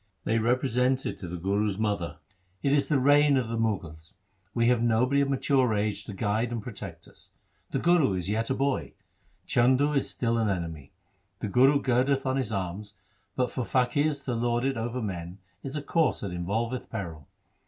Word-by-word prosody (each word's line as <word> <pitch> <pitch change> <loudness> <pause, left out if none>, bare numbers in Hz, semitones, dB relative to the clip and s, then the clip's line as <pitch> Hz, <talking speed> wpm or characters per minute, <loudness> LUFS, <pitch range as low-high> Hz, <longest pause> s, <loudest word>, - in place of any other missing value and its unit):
They 115 +1 +1
represented 125 +2 +1
to 90 - -6
the 90 +1 -5
Guru's 100 +3 0
mother, 105 -5 -2 0.2
' 95 +1 -40
It 140 - +2
is 145 -1 +3
the 150 - +2
reign 145 +1 +5
of 125 -3 -1
the 115 - -2
Mughals. 95 -7 -3 0.4
We 115 +2 +1
have 125 -2 +3
nobody 120 +4 +3
of 140 - +1
mature 130 -3 +2
age 105 0 -1
to 105 - -7
guide 110 +4 -1
and 120 - -2
protect 100 -7 -8
us. - - -14 0.4
The - - -1
Guru 170 - +3
is 90 -1 -3
yet 110 +3 -1
a 135 - +1
boy. 140 0 -1 0.5
Chandu 130 +5 +3
is 140 - 0
still 115 -1 0
an 110 -2 +1
enemy. 80 -7 -4 0.5
The 105 - -4
Guru 135 +6 +5
girdeth 130 +2 +2
on 130 0 +1
his 130 -5 -2
arms, 100 +1 -4 0.4
but 125 -1 0
for 130 - -2
faqirs 140 +4 +1
to 125 - -1
lord 120 +1 0
it 135 0 0
over 120 +2 -3
men 90 -3 -5 0.2
is 135 +1 -6
a 150 - -3
course 165 +1 +1
that 100 - -4
involveth 110 +8 -2
peril. 85 -9 -6
115 Hz, 190 wpm, -27 LUFS, 100-130 Hz, 0.5 s, reign